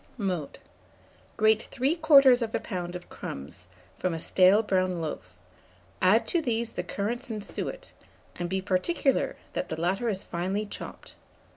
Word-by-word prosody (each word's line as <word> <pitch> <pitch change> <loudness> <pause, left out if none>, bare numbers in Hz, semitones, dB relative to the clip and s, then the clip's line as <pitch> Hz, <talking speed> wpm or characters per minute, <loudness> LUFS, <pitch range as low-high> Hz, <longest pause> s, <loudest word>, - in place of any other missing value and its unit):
Mode. 185 - -3 0.8
Grate 220 0 +3
3/4 275 -2 +5
lb. 180 -6 -3
of 180 - -8
crumbs 75 +7 -8 0.3
from 180 -2 0
a - - -4
stale 190 +6 +5
brown 185 -3 +1
loaf; 155 - -6 0.7
add 200 +5 +5
to 345 - +1
these 235 -4 -1
the - - -3
currants 240 +6 -3
and 215 -2 -4
suet, - - -5 0.4
and 175 -1 -3
be 190 +1 -1
particular 235 - +1 0.2
that - - -3
the - - -4
latter 195 +8 0
is 195 -2 -3
finely 190 +5 -2
chopped. 205 - -9
200 Hz, 140 wpm, -28 LUFS, 180-235 Hz, 0.8 s, 3/4